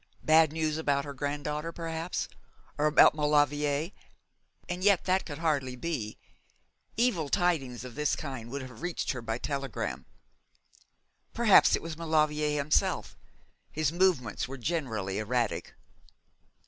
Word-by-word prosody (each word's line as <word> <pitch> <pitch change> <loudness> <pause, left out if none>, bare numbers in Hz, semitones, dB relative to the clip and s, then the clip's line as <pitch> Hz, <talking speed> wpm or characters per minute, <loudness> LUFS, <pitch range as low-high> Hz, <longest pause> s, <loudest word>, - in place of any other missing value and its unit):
Bad 160 -1 +5
news 155 -1 -1
about 140 -2 +1
her 140 - -6
granddaughter, 150 +3 -3
perhaps, 165 +1 -3 0.5
or 150 - +2
about 150 - +7
Maulevrier. 150 +1 +1 0.8
And 180 +1 -4
yet 200 -3 +4
that 185 +1 +1
could 145 -3 -6
hardly 145 -6 0
be. 125 -7 -4 0.8
Evil 215 - +1
tidings 140 - 0
of 125 - -8
that 150 +2 0
kind 130 -6 -6
would 140 +1 -5
have 130 -1 -11
reached 175 0 -2
her 125 - -5
by 115 0 -3
telegram. 135 -1 -4 1.3
Perhaps 225 -4 +6
it - - -5
was 165 -1 -6
Maulevrier 150 -2 +1
himself. 145 +1 +1 0.6
His 155 -2 0
movements 170 - +1
were 135 +1 -7
generally 115 - -2
erratic. 120 +2 -1
150 Hz, 130 wpm, -29 LUFS, 135-165 Hz, 1.3 s, about